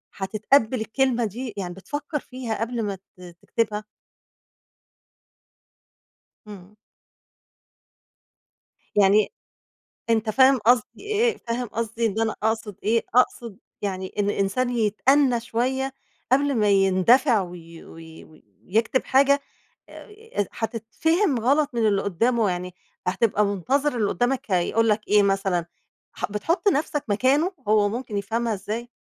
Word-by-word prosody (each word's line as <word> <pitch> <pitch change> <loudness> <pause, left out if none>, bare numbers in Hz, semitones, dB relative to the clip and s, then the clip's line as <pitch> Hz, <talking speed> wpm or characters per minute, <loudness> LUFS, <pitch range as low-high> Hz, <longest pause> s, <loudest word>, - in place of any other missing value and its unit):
هتتقبل 220 +4 +1
الكلمة 245 +1 0
دي، 230 +3 -5
يعني 180 -2 -4
بتفكّر 290 - -5
فيها 245 -5 -6
قبل 235 0 -2
ما 200 -2 -2
ت 190 0 -22 0.2
تكتبها؟ 215 -2 -2 2.6
إمم. 200 0 -12 2.2
يعني 205 +1 +4 0.8
أنت 225 -1 +1
فاهم 265 +4 +5
قصدي 235 +1 +2
إيه؟ 435 +3 +1
فاهم 240 +1 -4
قصدي 230 +1 -3
إن 220 +1 -2
أنا 220 -1 0
أقصد 220 -2 -1
إيه؟ 225 +2 +1
أقصد 235 -4 +1 0.2
يعني 190 -2 -4
إن 205 0 +1
الإنسان 205 +6 0
يتأنى 245 +3 +2
شوية 255 +3 -2 0.4
قبل 280 +1 +3
ما 210 -2 +2
يندفع 200 +5 +4
وي 170 -2 -10
وي 160 0 -13 0.4
ويكتب 225 +6 +1
حاجة 280 +1 +3 1.1
هتتفهم 260 - -1
غلط 280 +5 +2
من 230 -2 +1
اللي 200 -1 +2
قُدّامه، 225 +3 +1
يعني 180 0 -4 0.3
هتبقى 205 +2 +2
منتظر 250 - 0
اللي 210 -3 +1
قُدّامك 245 +2 0
هيقول 215 +5 +2
لك 210 0 +2
إيه 210 -1 +4
مثلًا، 195 -3 0 0.5
ح 180 +3 -4
بتحُط 330 - -1
نَفسك 295 -5 +1
مكانه، 270 - +2
هو 210 -1 +3
ممكن 225 -1 -4
يفهمها 225 +3 -1
إزاي؟ 215 +4 -5
225 Hz, 120 wpm, -24 LUFS, 200-255 Hz, 2.6 s, فاهم